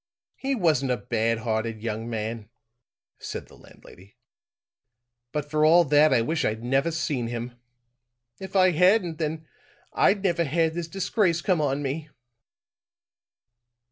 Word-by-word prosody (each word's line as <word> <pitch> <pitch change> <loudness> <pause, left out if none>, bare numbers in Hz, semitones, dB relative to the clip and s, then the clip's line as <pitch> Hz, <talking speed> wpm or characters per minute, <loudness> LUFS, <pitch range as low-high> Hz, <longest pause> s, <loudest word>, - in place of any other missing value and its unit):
"He 270 0 -2
wasn't 155 - +1
a 125 - +1
bad 115 +2 -1
hearted 110 -1 -3
young 115 0 -4
man," 110 -1 -4 0.7
said - - -6
the - - -19
landlady, 95 +3 -18 1.1
"but 150 -1 -3
for 155 +1 0
all 170 +3 +6
that 150 +1 +4
I 120 -3 +3
wish 155 +6 -1
I'd 110 +1 -2
never 135 +6 +1
seen 145 -7 -2
him. 120 +1 -5 0.9
If 190 0 -9
I 185 -1 +5
hadn't 180 -1 +3
then 160 0 -3 0.5
I'd 200 -1 +2
never 170 -3 +1
had 160 +2 0
this 170 -1 -4
disgrace 185 -1 0
come 180 -5 +1
on 145 0 -1
me." 150 +3 -4
150 Hz, 140 wpm, -25 LUFS, 115-170 Hz, 1.1 s, all